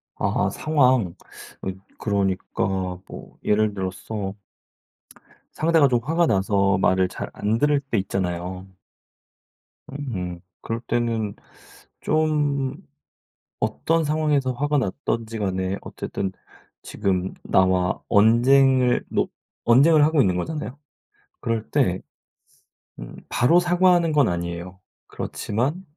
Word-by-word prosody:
아 - - 0
상황. 130 - +2 0.5
어 95 - -3 0.3
그러니까 95 -2 -1
뭐 - - -11
예를 105 0 +2
들어서 95 +1 -4 1.2
상대가 160 -3 +4
좀 120 -1 +2
화가 165 +3 +2
나서 100 0 +2
말을 95 0 +3
잘 - - -6
안 105 +2 0
들을 145 +3 +3
때 135 -4 -3
있잖아요. 95 -1 -3 1.2
음 95 -11 -5 0.2
그럴 115 0 -3
때는 115 -4 -1 0.7
좀 145 -3 +1 0.9
어떤 165 0 0
상황에서 150 -3 +1
화가 145 +3 0
났든지간에 100 -5 -2
어쨌든 95 -1 -4 0.5
지금 95 -1 -2
나와 95 -1 +2
언쟁을 125 +4 +4
뭐 - - +1 0.4
언쟁을 145 +6 +6
하고 155 -1 +3
있는 95 -7 +3
거잖아요. 150 - -4 0.6
그럴 115 -1 -2
때 115 -11 +1 1.0
음 - - -9
바로 165 +9 +4
사과하는 175 -1 +3
건 145 -5 +4
아니에요. 85 +1 -4 0.3
그렇지만 135 - -3
115 Hz, 215 characters per minute, -23 LUFS, 95-145 Hz, 1.2 s, 언쟁을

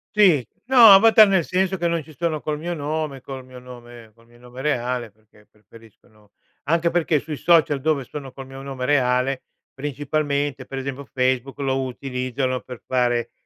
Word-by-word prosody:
Sì, 180 - +4 0.2
no, 240 -5 +8
avatar 220 +2 +7
nel 190 -3 +2
senso 190 +3 0
che 175 -1 -1
non 170 -2 -1
ci 155 0 -16
sono 160 0 -2
col 150 0 -4
mio 175 +2 -4
nome 150 -2 -3
col 135 -1 -8
mio 130 0 -14
nome 120 -2 -13
col 115 +1 -25
mio 120 0 -21
nome 125 +1 -11
reale, 125 -4 -2
perché 105 0 -26
preferisco, 110 +2 -20
no 105 -3 -26 0.3
anche 170 +3 +1
perché 165 -3 +1
sui 150 +1 -6
social 150 -4 +3
dove 150 -3 0
sono 135 0 -9
col 135 0 -10
mio 135 0 -10
nome 135 -2 -5
reale, 130 -1 +1 0.3
principalmente 145 -1 -2
per 135 - -7
esempio 135 +1 -5
Facebook, 130 +1 -1
lo 135 -1 -1
utilizzo, 130 0 -4
no, 130 0 -1
per 125 -2 -11
fare 120 -2 0
135 Hz, 185 wpm, -22 LUFS, 125-155 Hz, 0.3 s, no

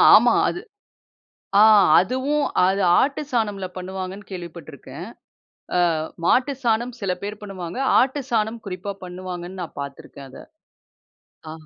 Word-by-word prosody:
ஆமா. - - +6 0.2
அது 355 - -5 1.0
ஆ - - +9 0.4
அதுவும், 260 +9 0 0.2
அது 195 +1 +1 0.2
ஆட்டு 280 +2 +1
சாணமில 205 -5 -1
பண்ணுவாங்கன்னு 190 +2 -6
கேள்விப்பட்டிருக்கேன். 170 -5 -9 0.7
அ - - +3 0.5
மாட்டு 260 +8 +3
சாணம் 235 +1 +1
சில 195 -2 -1
பேர் 205 +1 -5
பண்ணுவாங்க. 185 -2 -7 0.2
ஆட்டு 275 +2 +1
சாணம் 220 0 0
குறிப்பா 185 +2 -5
பண்ணுவாங்கன்னு 180 0 -7
நான் 160 - -10
பாத்திருக்கேன் 140 0 -9
அத. - - -11 1.1
ஆ. - - -6
195 Hz, 120 wpm, -22 LUFS, 180-235 Hz, 1.1 s, ஆ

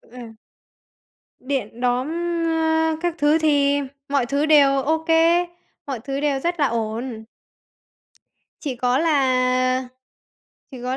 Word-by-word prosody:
Ờ. 250 - -16 1.2
Điện 255 -4 -4
đóm, 250 +1 0 0.4
á, 320 0 +1
các 350 -1 -1
thứ 295 +1 +3
thì 285 -3 +2 0.3
mọi 280 -3 +1
thứ 280 +4 0
đều 280 -3 +4
OK, 320 +3 -1 0.8
mọi 265 -4 -4
thứ 270 +4 -4
đều 285 -2 0
rất 345 +4 -2
là 285 - +3
ổn. 230 0 -4 1.4
Chỉ 275 -5 -4
có 250 +1 +1
là 255 -4 +1 0.8
chỉ 255 -3 -10
có 255 +1 -2
275 Hz, 120 wpm, -22 LUFS, 255-305 Hz, 1.4 s, đều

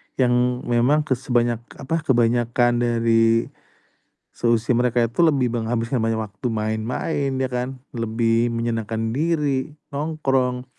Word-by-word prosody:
yang 125 0 +1
memang 125 +6 +2
ke 150 - -13
sebanyak 120 -2 0 0.2
apa, 160 +5 -2
kebanyakan 120 0 +2
dari 115 -1 +2 0.8
seusia 115 0 +1
mereka 120 0 +2
itu 115 +5 -3
lebih 140 -8 +3
menghabiskan 115 +1 -1
banyak 115 0 0
waktu 105 -1 -5
main-main 110 +6 -2
ya 130 0 0
kan, 125 +2 -3 0.2
lebih 115 0 +1
menyenangkan 115 -1 -2
diri, 145 -2 0 0.2
nongkrong 135 -4 -1
120 Hz, 115 wpm, -22 LUFS, 115-130 Hz, 0.8 s, lebih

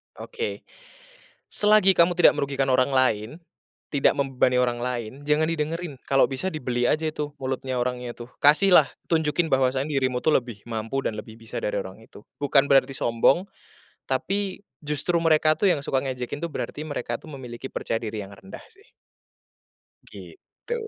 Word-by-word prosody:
Oke, 460 -1 -5 0.8
selagi 205 -2 +4
kamu 170 +1 +5
tidak 175 - +6
merugikan 140 -2 -1
orang 130 +1 +2
lain, 115 -5 +2 0.6
tidak 140 -2 +3
membebani 130 -2 +1
orang 125 -1 +1
lain 120 -2 -3
jangan 150 +1 +3
didengerin, 160 -2 -3
kalau 135 0 +4
bisa 135 +7 -1
dibeli 125 -8 -1
aja 155 0 +1
itu 150 -1 -5
mulutnya 130 0 -3
orangnya 125 -1 -3
tuh, 120 +1 -11
kasihlah 175 +6 +6 0.2
tunjukin 160 0 +1
bahwasanya 135 +2 +1
dirimu 130 -3 0
tuh 155 - +3
lebih 120 -7 -1
mampu 115 +4 -3
dan 110 - -2
lebih 110 - -10
bisa 115 -1 -6
dari 105 - -2
orang 95 +3 -8
itu. 105 - -16 0.2
Bukan 145 -1 +3
berarti 135 0 +4
sombong 120 +8 +2 0.7
tapi 195 -1 -2 0.2
justru 150 +4 0
mereka 155 -1 +4
tuh 200 - +3
yang 145 - -2
suka 135 -2 -1
ngejekin 130 +2 -4
tuh 170 - -3
berarti 150 - -5
mereka 125 -6 -3
tuh 155 - -14
memiliki 130 -1 -8
percaya 115 - -2
diri 110 -1 -4
yang 100 0 -9
rendah 95 0 -12
sih. 400 +3 -24 1.1
Gitu. 395 +4 -10
135 Hz, 160 wpm, -25 LUFS, 125-155 Hz, 1.1 s, tidak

